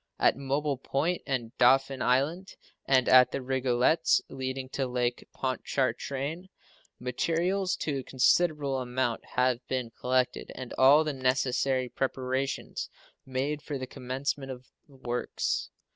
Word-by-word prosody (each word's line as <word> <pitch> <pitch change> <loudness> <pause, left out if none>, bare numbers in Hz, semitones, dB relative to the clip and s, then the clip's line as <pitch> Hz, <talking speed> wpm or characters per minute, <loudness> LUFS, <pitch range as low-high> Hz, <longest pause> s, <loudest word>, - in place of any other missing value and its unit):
At - - +4
Mobile 140 +1 -1
Point 155 +7 -1
and 130 -3 -2
Dauphin 135 +1 +4
Island, 145 +10 0 0.3
and 130 -2 +4
at 125 -1 +7
the - - -2
Rigolets, 130 +3 +2
leading 130 0 -4
to 135 -1 -2
Lake 125 -1 -2
Pontchartrain, 140 +5 -2 0.5
materials 170 +9 0
to 145 -3 -2
a - - -6
considerable 140 +1 +2
amount 125 -1 -1
have 125 -1 +2
been 125 -3 -2
collected, 125 +1 -1
and 130 -2 -7
all 140 +4 +6
the 155 -1 -2
necessary 130 0 +1
preparations 130 +1 -2 0.4
made 135 +3 -2
for 145 -1 -4
the 130 - -4
commencement 135 +2 -4
of 130 -1 -8 0.2
the 140 - -18
works. 125 -2 -2
130 Hz, 130 wpm, -29 LUFS, 125-140 Hz, 0.5 s, at